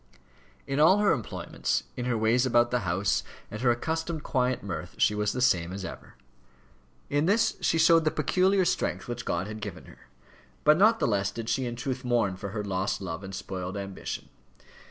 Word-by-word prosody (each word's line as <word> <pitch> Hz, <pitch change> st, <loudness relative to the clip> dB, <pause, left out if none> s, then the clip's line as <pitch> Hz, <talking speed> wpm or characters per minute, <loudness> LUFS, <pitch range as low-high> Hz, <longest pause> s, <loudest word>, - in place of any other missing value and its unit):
In 135 Hz, +1 st, -2 dB
all 165 Hz, +6 st, +6 dB
her 205 Hz, -1 st, +3 dB
employments, 115 Hz, -, -2 dB
in 125 Hz, -, -4 dB
her 125 Hz, -2 st, 0 dB
ways 110 Hz, +3 st, +3 dB
about 120 Hz, -2 st, +3 dB
the 125 Hz, -, +2 dB
house, 95 Hz, +3 st, +1 dB, 0.3 s
and 110 Hz, -, -6 dB
her 125 Hz, -, +3 dB
accustomed 160 Hz, +5 st, -1 dB
quiet 125 Hz, -2 st, 0 dB
mirth, 90 Hz, -2 st, -6 dB
she 105 Hz, -, +3 dB
was 105 Hz, 0 st, 0 dB
the 125 Hz, -, -3 dB
same 90 Hz, -8 st, +2 dB
as 95 Hz, 0 st, -5 dB
ever. -, -, -9 dB, 1.0 s
In 145 Hz, +3 st, +2 dB
this 225 Hz, +4 st, +3 dB
she -, -, +2 dB
showed 165 Hz, 0 st, +5 dB
the 155 Hz, -, +3 dB
peculiar 185 Hz, +6 st, +2 dB
strength -, -, -1 dB
which 120 Hz, 0 st, -5 dB
God 85 Hz, +2 st, -1 dB
had 105 Hz, +1 st, -7 dB
given -, -, -7 dB
her. -, -, -17 dB, 0.6 s
But 150 Hz, +2 st, +5 dB
not 220 Hz, +3 st, +6 dB
the -, -, +1 dB
less 100 Hz, -2 st, +1 dB
did 115 Hz, +3 st, -6 dB
she 130 Hz, -2 st, 0 dB
in 120 Hz, -, -4 dB
truth 130 Hz, +2 st, -4 dB
mourn 120 Hz, -6 st, +1 dB
for 100 Hz, +2 st, -6 dB
her 105 Hz, +1 st, -4 dB
lost 95 Hz, -1 st, -1 dB
love 90 Hz, -1 st, -5 dB
and 95 Hz, 0 st, -7 dB
spoiled 95 Hz, 0 st, -5 dB
ambition. 100 Hz, -1 st, -6 dB
120 Hz, 195 wpm, -28 LUFS, 100-150 Hz, 1.0 s, all